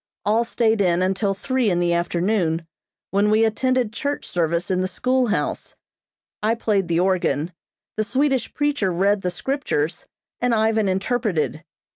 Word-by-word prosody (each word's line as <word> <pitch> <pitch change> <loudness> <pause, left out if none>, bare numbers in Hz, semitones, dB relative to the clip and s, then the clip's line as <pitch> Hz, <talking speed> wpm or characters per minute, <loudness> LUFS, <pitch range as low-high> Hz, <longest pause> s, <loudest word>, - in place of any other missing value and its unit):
All 220 +3 +3
stayed 225 -2 +1
in 180 -1 +2
until 195 +1 0
three 255 +1 0
in 175 -2 +1
the 175 -1 +2
afternoon, 170 -1 0 0.5
when 200 +2 +2
we 215 +1 +4
attended 250 0 0
church 285 +5 -3
service 170 +1 -1
in 185 0 +1
the 185 - 0
schoolhouse. 255 +2 -1 0.7
I 220 +2 +2
played 205 -5 0
the 170 0 +1
organ, 180 -3 0 0.4
the 215 - +2
Swedish 265 +3 0
preacher 290 -10 0
read 195 +3 +2
the 180 - -1
Scriptures, 180 - -2 0.3
and 245 -1 +2
Ivan 220 -1 +2
interpreted. 190 -5 -1
205 Hz, 145 wpm, -22 LUFS, 180-230 Hz, 0.7 s, we